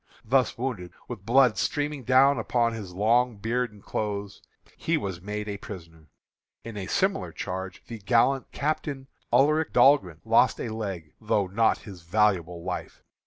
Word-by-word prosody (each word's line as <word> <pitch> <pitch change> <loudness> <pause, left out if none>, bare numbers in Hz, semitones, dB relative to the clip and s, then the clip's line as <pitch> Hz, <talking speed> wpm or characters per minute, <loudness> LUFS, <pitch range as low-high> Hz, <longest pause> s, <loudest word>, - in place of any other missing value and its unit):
Thus 130 +3 +2
wounded, 115 -8 -4
with 110 -4 -8
blood 125 -1 +4
streaming 145 -2 -1
down 135 +2 +5
upon 120 -2 +1
his 100 -6 -7
long 115 +3 +2
beard 120 +3 -1
and 105 -2 -17
clothes, 100 -2 -4 0.3
he 165 0 0
was 95 - -4
made 105 +2 -5
a 100 -1 -4
prisoner. 85 -8 -11 0.6
In 115 -2 -8
a 95 -2 -5
similar 195 - 0
charge 95 0 -6
the 115 -2 -8
gallant 120 +5 +2
Captain 145 -2 -2 0.3
Ulric 155 +3 +3
Dahlgren 120 - +4
lost - - +4
a - - -3
leg, 95 -8 -5
though 105 -2 +1
not 110 +5 +2
his 95 -5 -10
valuable 90 -2 +1
life. 90 0 -6
110 Hz, 155 wpm, -26 LUFS, 95-130 Hz, 0.6 s, down